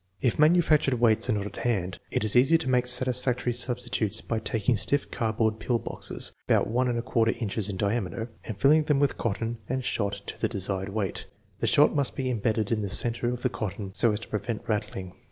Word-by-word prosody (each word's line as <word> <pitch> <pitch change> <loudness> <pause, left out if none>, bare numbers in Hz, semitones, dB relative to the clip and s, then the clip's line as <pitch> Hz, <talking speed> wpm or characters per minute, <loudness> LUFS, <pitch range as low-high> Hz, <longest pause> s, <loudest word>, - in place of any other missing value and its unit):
1 - - +2
If - - -13
manufactured 155 -4 +4
weights 115 0 +3
are - - +3
not 100 -1 -2
at 105 - -7
hand, 95 -7 -1
it - - -1
is 110 +1 +2
easy 135 +7 +6
to 160 - -6
make 125 -1 +2
satisfactory 125 -1 +2
substitutes 120 -4 -1
by 115 - -3
taking 110 +1 0
stiff 140 +7 +1
cardboard 110 -1 0
pill 120 0 0
boxes, - - -2 0.2
about - - +3
1^4 120 -1 0
inches 105 -2 -2
in 95 - -4
diameter, 110 +3 -2
and 110 - -6
filling 150 +4 +4
them 150 -2 +2
with 145 -2 +1
cotton 115 +1 -2
and 130 0 -2
shot 100 -2 -1
to - - -7
the - - +1
desired 95 -2 -2
weight. 100 -2 -3 0.3
The - - 0
shot 145 - +4
must 140 -2 0
be 130 -1 -2
embedded 110 -2 -1
in 110 -2 +1
the 100 - -3
center 120 +4 +1
of 125 -1 -6
the 130 - +2
cotton 100 -3 -5
so 115 +2 +3
as 105 - -2
to - - -8
prevent 105 +1 -4
rattling. 95 -4 -3
115 Hz, 210 wpm, -27 LUFS, 105-125 Hz, 0.3 s, easy